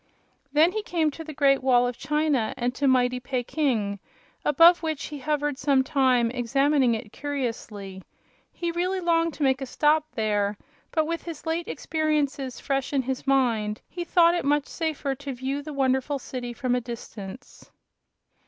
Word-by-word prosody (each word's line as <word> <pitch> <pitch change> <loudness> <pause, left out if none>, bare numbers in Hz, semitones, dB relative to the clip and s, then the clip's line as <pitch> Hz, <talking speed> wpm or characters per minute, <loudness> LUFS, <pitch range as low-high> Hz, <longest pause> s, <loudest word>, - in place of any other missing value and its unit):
Then 310 +4 +5
he 435 - -2
came 330 -6 0
to 325 - -8
the 315 - -8
Great 275 -2 +3
Wall 250 -2 +4
of 245 0 -2
China 300 -5 0
and 245 +1 -1
to 280 +2 0
mighty 250 -1 +3
Peking, 245 -5 -1 0.4
above 335 +4 +6
which 315 -3 -3
he 295 -1 -7
hovered 295 0 -1
some 270 -2 +3
time, 255 -4 +2
examining 265 +1 +2
it 220 -1 -7
curiously. 230 -9 -5 0.5
He 345 -1 -3
really 365 +3 -1
longed 335 -2 +1
to 295 - -3
make 265 0 +2
a 270 - -4
stop 300 +3 +2
there, 210 -2 0 0.3
but 315 -1 +1
with 335 +1 -3
his 330 -3 -8
late 325 +1 -1
experiences 295 -4 -1
fresh 275 0 -2
in 270 -2 +2
his 260 +2 -4
mind 230 -6 +1
he 350 - -5
thought 340 0 +4
it 350 - -1
much 290 0 +2
safer 310 -4 -2
to 275 +1 -6
view 265 +3 -3
the 305 +1 -7
wonderful 270 0 +1
city 250 -2 -6
from 245 +1 -1
a 250 - +1
distance. 235 -1 -9
275 Hz, 170 wpm, -26 LUFS, 245-305 Hz, 0.5 s, above